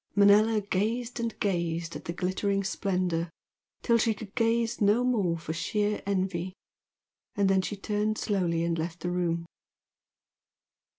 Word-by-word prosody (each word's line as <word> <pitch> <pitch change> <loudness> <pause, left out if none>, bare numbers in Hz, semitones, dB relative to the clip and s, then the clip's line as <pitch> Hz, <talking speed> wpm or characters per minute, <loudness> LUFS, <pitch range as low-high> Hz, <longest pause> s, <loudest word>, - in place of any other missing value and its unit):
Manella 210 +2 +5
gazed 225 +5 -1
and 230 -1 -3
gazed 170 -3 -1
at - - -8
the - - -2
glittering 190 +3 -1
splendour 180 -3 -1 0.5
till 235 -1 +3
she 225 -1 +2
could 200 -1 -10
gaze 230 0 +1
no 210 +4 +4
more 205 -9 +1
for 160 -1 -5
sheer 205 +6 -1
envy, 185 -2 -1 0.8
and 200 -1 +2
then 190 0 +3
she 205 - -4
turned 210 +1 -1
slowly 175 -5 0
and 170 -1 0
left 165 +1 -4
the 175 - -2
room. 170 -1 -1
195 Hz, 140 wpm, -28 LUFS, 175-215 Hz, 0.8 s, Manella